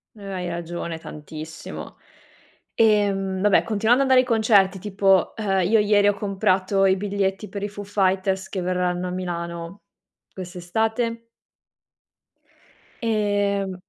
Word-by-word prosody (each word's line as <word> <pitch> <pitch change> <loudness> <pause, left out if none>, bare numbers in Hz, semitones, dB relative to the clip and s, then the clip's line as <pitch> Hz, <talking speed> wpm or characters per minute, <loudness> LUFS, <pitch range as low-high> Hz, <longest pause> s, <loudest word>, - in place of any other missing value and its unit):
Eh, 205 - -13
hai 180 -1 -4
ragione 170 -1 -5
tantissimo. 155 +1 -9 0.8
Ehm, 200 -4 +2
vabbè, 205 -1 +4
continuando 225 +5 +2
ad 265 - -1
andare 260 - +6
ai 255 - +3
concerti, 205 -4 +4
tipo, 195 -1 +2
ehm, 195 -3 0
io 220 +1 +4
ieri 205 -1 +4
ho 205 - +4
comprato 195 -1 +1
i 190 0 +4
biglietti 200 +1 -2
per 200 -1 -6
i 205 - -2
Foo 205 0 -8
Fighters, 190 -1 0
che 190 - -3
verranno 180 0 -1
a - - -4
Milano 170 0 -5 0.5
quest'estate 220 +6 -3 1.7
ehm 205 -3 0
195 Hz, 125 wpm, -23 LUFS, 185-210 Hz, 1.7 s, andare